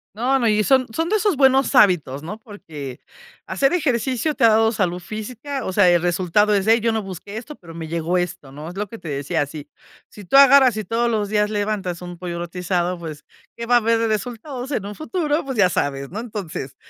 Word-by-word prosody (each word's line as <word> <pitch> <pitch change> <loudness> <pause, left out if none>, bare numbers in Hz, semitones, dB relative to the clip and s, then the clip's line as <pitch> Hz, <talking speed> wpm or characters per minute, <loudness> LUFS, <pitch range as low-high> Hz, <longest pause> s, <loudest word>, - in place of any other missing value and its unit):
No, 255 +5 +1
no, 235 - +1
y 215 -1 +3
son 260 +1 +3
son 325 +8 -1
de 430 - +3
esos 405 -7 +1
buenos 270 0 +3
hábitos, 165 - +3
¿no? 210 +7 -7
Porque 160 - -9 0.5
hacer 275 +2 +1
ejercicio 265 -2 0
te 280 - -2
ha 230 - +8
dado 225 +1 +4
salud 180 -5 -1
física, 235 +8 -6
o - - -2
sea, 185 -1 +4
el 175 -1 +3
resultado 185 +4 +2
es 195 -1 0
de: 225 +2 +5
"Yo 230 +1 +1
no 220 -1 -2
busqué 195 +2 -8
esto, 280 +6 -8
pero 165 -7 -13
me 165 -1 -6
llegó 170 +2 -1
esto", 175 -6 -4
¿no?, 150 +3 -9
es 175 - -10
lo 205 +1 -3
que 230 - -9
te 175 - -11
decía 145 +2 -1
si 145 +1 -10 0.4
si 205 - -13
tú 180 - -1
agarras 275 -3 +7
y 215 - -2
todos 235 +4 0
los 210 -2 -1
días 210 0 +1
levantas 205 -4 -2
un 175 -1 -8
pollo 175 -1 -5
rostizado, 180 +1 -2
pues, 155 -3 -8 0.3
qué 235 0 -6
va 245 - +4
a - - +8
haber 230 0 +2
de 230 - +1
resultados 245 +5 -4
en 215 -8 -2
un 205 - -7
futuro, 310 - -2
pues, 265 -3 -4
ya 195 -4 +5
sabes, 140 -4 -2
¿no? 205 - -6
Entonces, 200 - -6
210 Hz, 230 wpm, -21 LUFS, 175-245 Hz, 0.5 s, ha